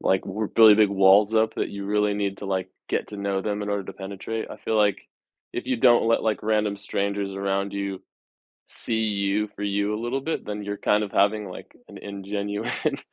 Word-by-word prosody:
like 95 0 +2
re 105 +2 -3
really 110 -2 +10
big 105 -1 +5
walls 100 +2 +5
up 110 0 +2
that - - -1
you 100 0 -6
really 105 0 +1
need 100 -1 -2
to, 100 - -7
like, 95 -1 -1 0.2
get - - -1
to 105 - -8
know 100 -1 -1
them 105 0 -2
in 105 - -4
order 100 -1 -1
to - - -8
penetrate. 100 +3 -5
I - - -7
feel 110 - -1
like, 105 -2 +3 0.5
if - - -4
you 130 - 0
don't 120 -1 +5
let, 115 - +3
like, 110 -2 0
random 105 -1 +1
strangers 100 -1 -2
around 100 0 -1
you, 100 -1 -4 0.7
see 110 -1 -2
you 100 0 0
for 105 - -8
you 100 +1 0
a 105 - -4
little 130 +3 -1
bit, 160 - -3
then 105 0 -4
you're 100 0 -3
kind 105 0 +2
of 100 - -8
having, 105 +1 +2
like, 90 - -11
an - - -11
ingenuine 105 +8 -3
105 Hz, 215 wpm, -25 LUFS, 100-110 Hz, 0.7 s, really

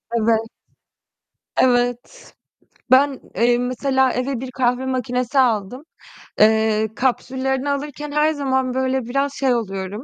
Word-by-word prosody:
Evet. 225 0 +2 1.2
Evet. 245 - 0 0.6
Ben, 270 +1 +4 0.2
eee, 240 +1 +3
mesela 260 +1 +1
eve 255 0 -2
bir 260 0 -7
kahve 250 0 0
makinesi 255 +1 -1
aldım. 240 +1 0 0.6
Eee, 220 0 +3
kapsüllerini 265 +1 -1
alırken 290 +1 -4
her 300 +1 +2
zaman 265 -3 -1
böyle 260 0 0
biraz 275 +3 -1
şey 265 -3 +1
oluyorum 195 0 -4
255 Hz, 115 wpm, -20 LUFS, 240-270 Hz, 1.2 s, Ben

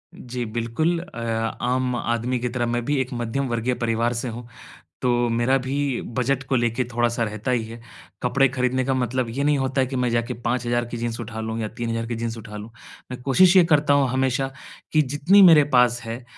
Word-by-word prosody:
जी, 125 -1 -5
बिल्कुल। 120 +10 -1
अ, 165 -9 -9 0.4
आम 125 0 0
आदमी 120 +1 -1
की 125 0 -2
तरह 120 0 -1
मैं 120 - -1
भी 145 +2 0
एक 130 +1 -4
मध्यम 120 +3 -2
वर्गीय 120 +2 0
परिवार 115 +1 +1
से - - -4
हूँ, 120 +1 -8 0.5
तो 125 - +1 0.2
मेरा 120 +3 +2
भी 135 -1 -1 0.2
बजट 135 +1 0
को 130 - +2
लेकर 120 +1 +1
थोड़ा-सा 120 0 +1
रहता 110 +3 -3
ही 120 -3 +1
है। 115 +1 -10 0.4
कपडे 135 +2 +3
खरीदने 130 0 0
का 135 - +1
मतलब 125 -1 -1
ये 135 +5 -2
नहीं 150 0 +3
होता 135 0 0
है 130 - +1
कि 135 - -5
मैं 125 -1 +1
जाके 115 0 -1
5000 120 0 -1
की 120 - -4
जीन्स 115 0 -3
उठा 110 -1 -6
लूँ 110 0 -4
या 110 - -2
3000 115 -1 -2
की 120 - -3
जीन्स 115 0 -4
उठा 105 -1 -9
लूँ। 105 +2 -8 0.4
मैं 125 - -6
कोशिश 175 +9 +4
ये 180 - +8
करता 145 -1 +4
हूँ 140 -1 +3
हमेशा, 130 +1 0 0.4
कि 155 - +5
जितनी 150 +8 +4
मेरे 165 -6 +8
पास 120 -1 +3
है 115 +2 -6
125 Hz, 215 wpm, -23 LUFS, 115-135 Hz, 0.5 s, ये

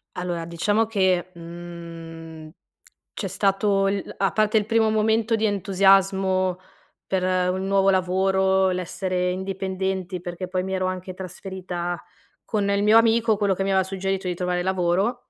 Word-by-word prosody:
Allora, 175 -2 -3
diciamo 205 +7 0
che, 185 -4 +1
mhmm, 165 -2 -9 0.6
c'è 200 - -4
stato 195 +1 +1
il 195 0 -3
a 195 - +2
parte 215 0 +1
il 210 -2 +2
primo 225 -1 +3
momento 220 +1 +2
di 220 0 +2
entusiasmo 195 -2 +2 0.5
per 185 -1 0 0.3
un 190 +1 -2
nuovo 195 0 +3
lavoro, 190 +1 +2
l'essere 180 0 -2
indipendenti, 190 -1 -3
perché 175 +1 -5
poi 185 0 -2
mi 190 0 -3
ero 185 0 0
anche 185 0 -4
trasferita 180 -1 -5 0.4
con 205 -2 -1
il 200 0 +1
mio 220 +2 +7
amico, 230 -1 +3
quello 200 -2 +1
che 195 - -2
mi 195 - -1
aveva 190 0 +3
suggerito 195 0 -3
di 180 - -1
trovare 180 0 -1
lavoro, 190 +6 0
190 Hz, 150 wpm, -24 LUFS, 180-200 Hz, 0.6 s, mio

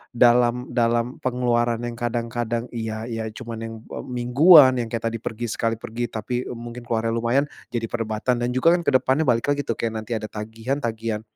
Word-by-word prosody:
dalam 120 0 +4
dalam 120 0 0
pengeluaran 120 -2 +1
yang 120 0 -3
kadang-kadang, 120 0 -2
iya 110 -1 -4
iya, 115 -2 -4
cuman 115 +1 -7
yang 115 0 -5 0.3
mingguan 130 +3 +6
yang 115 - -4
kayak 115 0 -3
tadi 115 - -4
pergi 115 +1 -4
sekali 115 0 0
pergi 115 +1 -4
tapi, 110 +3 -4
eee, 120 - -6
mungkin 120 +1 -8
keluarnya 115 0 0
lumayan 120 +5 +1 0.2
jadi 120 -1 -2
perdebatan. 115 +2 -1
Dan 120 - 0
juga 165 +7 +5
kan 175 - +1
ke - - +5
depannya 135 +4 0
balik 115 -2 +2
lagi 145 0 0
tuh 115 - -1
kayak 115 -1 -2
nanti 110 +2 -4
ada 110 - -5
tagihan 110 +6 -4
tagihan 110 -3 -2
120 Hz, 190 wpm, -23 LUFS, 115-125 Hz, 0.3 s, mingguan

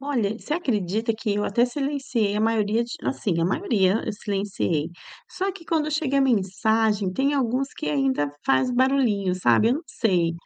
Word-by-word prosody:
Olha, 235 -7 -1
você 305 - -3
acredita 225 - -1
que 215 -2 -2
eu 205 - -1
até 235 +4 +2
silenciei 265 -6 -1
a 210 - 0
maioria 220 0 +1
de 235 - -9
assim, 190 -10 -1
a - - +2
maioria 200 - +1
eu - - -3
silenciei. 195 -6 -2 0.4
Só 385 +1 -2
que 350 -3 -12
quando 310 -2 0
chega 290 -2 0
a - - +4
mensagem, 210 -3 +1
tem 275 +7 +1
alguns 265 +1 0
que - - -6
ainda 140 0 0
faz 260 -1 +2
barulhinho, 245 -7 +2
sabe. 180 - +3
Eu 250 - +3
não 315 - -4
sei. 180 -9 +1
225 Hz, 180 wpm, -24 LUFS, 195-270 Hz, 0.4 s, a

